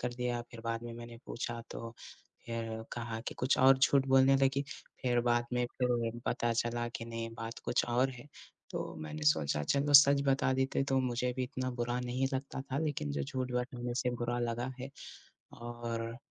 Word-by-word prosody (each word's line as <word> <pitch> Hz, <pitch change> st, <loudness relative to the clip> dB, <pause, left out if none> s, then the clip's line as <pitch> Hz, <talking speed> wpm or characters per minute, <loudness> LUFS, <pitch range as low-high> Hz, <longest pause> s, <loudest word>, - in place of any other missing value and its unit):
कर 125 Hz, 0 st, -2 dB
दिया, 125 Hz, -1 st, -1 dB
फिर 115 Hz, -, -9 dB
बाद 115 Hz, 0 st, -2 dB
में 120 Hz, -, -6 dB
मैंने 120 Hz, 0 st, -9 dB
पूछा 115 Hz, 0 st, -4 dB
तो 115 Hz, 0 st, -6 dB, 0.6 s
फिर 115 Hz, -1 st, -3 dB
कहा 115 Hz, -1 st, -4 dB
कि -, -, -7 dB
कुछ 130 Hz, +3 st, +2 dB
और, 130 Hz, 0 st, +7 dB
झूठ 135 Hz, 0 st, +4 dB
बोलने 135 Hz, +1 st, +6 dB
लगी, 135 Hz, +1 st, +2 dB, 0.4 s
फिर 120 Hz, -1 st, +3 dB
बाद 120 Hz, 0 st, +3 dB
में 125 Hz, 0 st, +2 dB
फिर 120 Hz, -2 st, +1 dB
पता 120 Hz, 0 st, +1 dB
चला 120 Hz, +1 st, 0 dB
कि -, -, -6 dB
नहीं, 115 Hz, 0 st, -4 dB
बात 115 Hz, 0 st, -6 dB
कुछ 120 Hz, -, +2 dB
और 125 Hz, +3 st, +3 dB
है। 125 Hz, +1 st, -11 dB, 0.5 s
तो -, -, -3 dB
मैंने 75 Hz, 0 st, -6 dB
सोचा 75 Hz, -1 st, 0 dB
चलो 140 Hz, -, +1 dB
सच 140 Hz, 0 st, +9 dB
बता 135 Hz, -1 st, +3 dB
देते 130 Hz, +1 st, +1 dB
तो 135 Hz, -, +3 dB
मुझे 125 Hz, 0 st, 0 dB
भी 130 Hz, -, 0 dB
इतना 130 Hz, 0 st, -3 dB
बुरा 120 Hz, +1 st, 0 dB
नहीं 125 Hz, +2 st, 0 dB
लगता 135 Hz, 0 st, -3 dB
था 135 Hz, 0 st, -3 dB
लेकिन 145 Hz, -, -1 dB
जो 70 Hz, 0 st, -1 dB
झूठ 130 Hz, -, -3 dB
बात 125 Hz, 0 st, 0 dB
बोलने 120 Hz, 0 st, -3 dB
से 125 Hz, -, +1 dB
बुरा 120 Hz, 0 st, -1 dB
लगा 120 Hz, +2 st, -1 dB
है। 130 Hz, +2 st, -5 dB, 0.7 s
और 115 Hz, -1 st, -4 dB
120 Hz, 195 wpm, -33 LUFS, 115-130 Hz, 0.7 s, सच